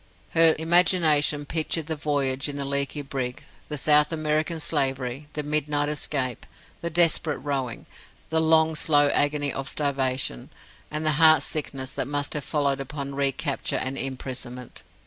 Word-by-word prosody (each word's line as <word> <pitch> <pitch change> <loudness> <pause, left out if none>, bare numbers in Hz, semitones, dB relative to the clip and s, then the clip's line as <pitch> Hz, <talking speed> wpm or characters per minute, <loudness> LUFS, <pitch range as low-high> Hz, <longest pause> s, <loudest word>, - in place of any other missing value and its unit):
Her 165 -1 +5
imagination 160 -3 +3
pictured 160 +1 -1
the 160 +1 -3
voyage 140 -2 -1
in 145 - -5
the 140 - -3
leaky 140 +1 -2
brig, 130 -2 -5 0.2
the 150 - -4
South 150 +2 +4
American 155 +1 -1
slavery, 135 -2 -1
the 150 - -3
midnight 150 0 -1
escape, 135 -5 -2 0.3
the 170 - -2
desperate 165 -2 +4
rowing, 135 -3 -4 0.4
the 160 0 +2
long, 160 0 +4
slow 145 -2 +3
agony 145 0 +1
of 135 0 -4
starvation, 130 - -1 0.4
and 155 +1 -4
the 155 - +3
heart 155 -3 +6
sickness 135 -3 -3
that - - -3
must 145 0 -2
have 150 - -3
followed 140 -2 0
upon 140 0 -6
recapture 140 0 -1
and 130 +1 -3
imprisonment. 130 -2 -6
145 Hz, 145 wpm, -25 LUFS, 135-155 Hz, 0.4 s, heart